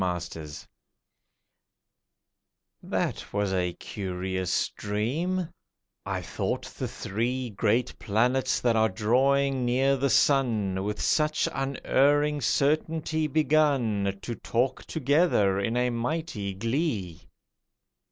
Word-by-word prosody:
A 90 -1 0
DREAM 75 -2 -8 2.3
That - - -3
was 100 -1 0
a 90 -2 0
curious 95 -2 -2
dream; 155 - -2 0.6
I - - -2
thought - - -3
the - - -5
three 120 +4 -3
Great 110 +5 0
planets 125 +5 +1
that 120 -2 +2
are 110 0 +3
drawing 130 +6 +2
near 130 +3 +2
the 135 +1 +1
sun 110 -10 +2
With 105 +1 -3
such 155 0 +2
unerring 145 +2 +1
certainty 155 +4 +1
begun 135 -10 +2
To 120 - -3
talk 120 +3 -1
together 140 - +2
in 115 +4 -1
a 125 0 +1
mighty 120 - -3
glee. 115 - -2
120 Hz, 105 wpm, -27 LUFS, 100-140 Hz, 2.3 s, are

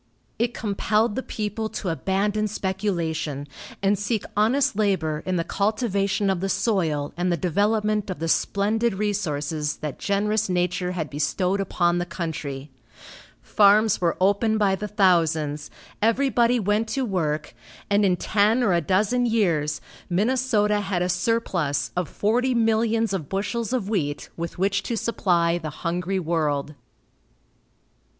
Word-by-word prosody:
It 235 0 0
compelled 210 +1 0
the 260 - -2
people 220 -2 -4
to 195 - -4
abandon 195 +7 0
speculation, 170 -8 -2 0.4
and 195 0 +2
seek 210 +1 -1
honest 225 +4 +2
labor 185 -8 0
in 185 - 0
the 170 - 0
cultivation 200 -1 0
of 190 - -1
the 195 +2 -2
soil 160 -11 0
and 175 +1 0
the 170 - +1
development 210 +5 +1
of 185 - -3
the 165 +2 -3
splendid 210 +6 +1
resources 155 -7 -2
that 150 -3 -6
generous 205 +1 0
nature 180 0 0
had 160 -4 -4
bestowed 180 +7 0
upon 175 -2 +1
the 175 - -3
country. 155 -5 -5 0.7
Farms 210 0 +4
were 170 -2 +1
opened 205 +4 +2
by 200 -2 +2
the 210 +2 -3
thousands, 160 -7 +1 0.3
everybody 240 +1 +3
went 210 +2 +1
to 270 +1 -1
work, 155 -7 -2 0.3
and 205 +1 +2
in 185 -3 +3
ten 215 +6 +2
or 200 -6 +3
a 170 - +2
dozen 210 +9 +1
years, 165 -10 +1 0.3
Minnesota 210 +1 +2
had 190 -3 -1
a 180 - -1
surplus 175 -6 0
of 180 -2 -1
forty 245 +5 +1
millions 225 -1 +2
of 160 -7 -3
bushels 210 +4 -2
of 245 -7 -1
wheat 155 -9 -2
with 170 0 -5
which 195 +2 +1
to 230 +3 -3
supply 175 -7 +1
the 155 -2 -5 0.2
hungry 180 +3 -1
world. 155 -4 -1
195 Hz, 145 wpm, -24 LUFS, 170-215 Hz, 0.7 s, Farms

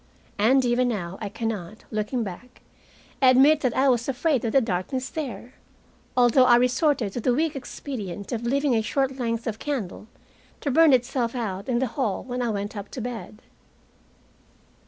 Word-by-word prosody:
And 255 +5 +4
even 245 +1 +2
now 190 -6 -3
I 210 - -3
can 225 +3 -4
not, 210 0 -6
looking 215 +3 -1
back, 225 +6 -9 0.6
admit 270 +4 +6
that 250 -4 0
I 270 +1 +4
was 245 -1 +2
afraid 270 0 +1
of 230 - -1
the 270 - +5
darkness 235 +4 -2
there, 250 -5 -6 0.6
although 250 +1 +5
I 245 -1 +7
resorted 250 - +2
to 240 - -3
the 245 +2 +2
weak 315 +1 0
expedient 220 -7 -6
of 235 -1 -3
leaving 275 +3 +1
a 225 - +2
short 270 +3 -1
length 230 -1 -2
of 225 -3 -3
candle 230 -8 -4 0.5
to 285 - -1
burn 320 +3 +6
itself 245 -1 +1
out 200 -3 -4
in 240 - +1
the 260 - +1
hall 235 -4 -2
when 250 0 -4
I 240 - 0
went 205 0 -3
up 200 -1 -6
to - - -7
bed. 235 -2 -7
245 Hz, 180 wpm, -25 LUFS, 220-265 Hz, 0.6 s, I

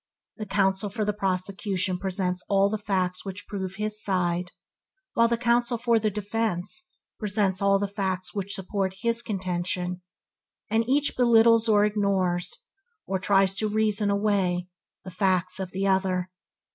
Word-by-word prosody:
The 215 -2 -6
counsel 195 0 +1
for 210 +2 -2
the 210 - 0
prosecution 190 -1 -1
presents 185 -1 -2
all 195 0 +4
the 215 - -2
facts 185 -3 -1
which 195 0 -6
prove 190 -3 -5
his 210 +1 -2
side, 180 -2 0 0.6
while 230 0 +4
counsel 240 0 +1
for 235 -1 +2
the 215 0 +1
defense 210 - -1 0.3
presents 195 -2 0
all 200 0 +4
the 200 +1 -1
facts 190 -2 -3
which 200 0 -3
support 190 0 -2
his 235 0 +3
contention, 180 -3 -3 0.7
and 225 +2 +1
each 285 +2 +2
belittles 230 -2 +5
or 210 -1 +5
ignores, 195 -4 0 0.4
or 190 -1 -2
tries 195 0 +3
to 215 0 0
reason 210 -1 +1
away, 200 -3 +1 0.4
the 185 - -8
facts 185 0 0
of 190 -2 -4
the 195 +1 -2
other. 185 -1 +1
195 Hz, 145 wpm, -26 LUFS, 185-215 Hz, 0.7 s, belittles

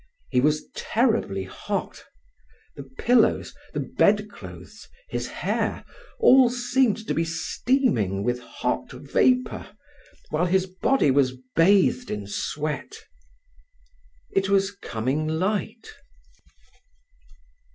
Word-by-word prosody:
He 125 - +3
was 150 +2 +1
terribly 220 - 0
hot. 95 - -5 0.7
The - - -7
pillow, 220 - +2 0.3
the - - 0 0.2
bedclothes, - - -1 0.2
his - - -3
hair, - - -2 0.3
all 260 -1 +6
seemed 245 -2 +1
to - - 0
be 165 - +1
steaming 165 - 0
with 125 +2 0
hot - - -3
vapour, 255 0 +1 0.6
whilst 175 +4 +1
his 190 -1 +3
body 185 - +1
was 130 -2 +2 0.2
bathed 200 +8 +4
in 105 -1 -4
sweat. 150 - -4 1.4
It 195 0 +1
was 195 0 +2
coming 140 - -3
light. 200 +7 -2
180 Hz, 100 wpm, -25 LUFS, -, 1.4 s, all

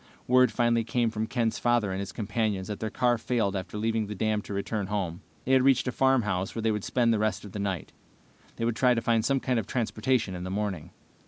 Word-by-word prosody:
Word 125 0 +5
finally 120 -1 +2
came 115 0 0
from 110 0 -2
Ken's 115 -3 -1
father 120 -5 +2
and 95 - -3
his 100 - -4
companions 105 -3 -2
that 105 - -4
their 110 - -2
car 120 +2 +2
had - - -16
failed 110 -6 0
after 95 +2 -5
leaving 110 0 0
the 105 - -5
dam 110 +1 0
to - - -10
return 100 0 -2
home. 95 -5 -3 0.2
They 130 - 0
had 130 -1 +6
reached 135 0 +3
a - - +1
farmhouse 115 -9 +1
where 115 - -2
they 110 - +2
would 105 -2 -2
spend 120 -2 +2
the 110 - +1
rest 110 0 -1
of 100 - -9
the 105 - -6
night. 95 -4 -3 0.6
They 115 - -2
would 115 -1 0
try 125 +1 +4
to 115 - 0
find 115 -1 +2
some 135 +3 +2
kind 125 -2 0
of 105 - -5
transportation 115 -2 0
in 90 0 -5
the 90 - -4
morning. 95 -5 -3
110 Hz, 250 wpm, -28 LUFS, 100-120 Hz, 0.6 s, had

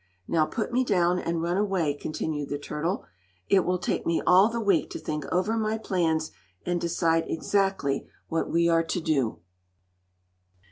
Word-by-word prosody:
"Now 155 -2 +2
put 230 +1 -3
me 255 +1 +3
down 180 -5 +2
and 165 -1 -2
run 175 +2 0
away," 190 -7 +1
continued 150 0 -4
the 145 - -2
turtle. 150 +5 -3 0.4
"It 190 -2 +5
will 180 +1 0
take 180 - -2
me 170 - +1
all 190 +4 +6
the 235 0 -3
week 200 -6 +2
to - - -6
think 150 -2 -4
over 185 +5 +1
my 220 0 0
plans, 165 -7 0 0.3
and 175 -1 -1
decide 165 -1 +1
exactly 195 -5 0 0.2
what 165 - -1
we 170 0 +3
are 165 -1 +3
to 165 - -2
do." 140 - 0
170 Hz, 170 wpm, -27 LUFS, 160-195 Hz, 0.4 s, all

